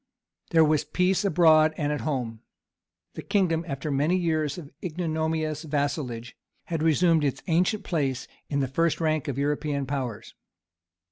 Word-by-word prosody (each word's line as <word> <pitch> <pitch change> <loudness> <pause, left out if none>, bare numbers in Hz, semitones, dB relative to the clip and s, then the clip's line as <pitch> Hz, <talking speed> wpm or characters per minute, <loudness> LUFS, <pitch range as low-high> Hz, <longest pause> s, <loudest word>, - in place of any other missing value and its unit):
There 160 -2 +5
was 155 -1 +2
peace 185 +2 +1
abroad 160 -4 +5
and 145 -1 -1
at 150 - -3
home. 125 -7 -3 0.7
The - - -6
kingdom, 175 -5 +1
after 145 +1 -4
many 150 +6 +2
years 155 -4 0
of 150 -5 -9
ignominious 160 -2 -2
vassalage, 140 -6 -3 0.3
had 165 -3 -3
resumed 165 0 +3
its 140 -3 -1
ancient 180 +5 +1
place 140 -8 -1 0.2
in 140 -1 0
the 135 - 0
first 165 +5 +1
rank 155 -2 0
of 140 -2 -3
European 145 0 -1
powers. 130 -5 -4
155 Hz, 145 wpm, -26 LUFS, 140-165 Hz, 0.7 s, There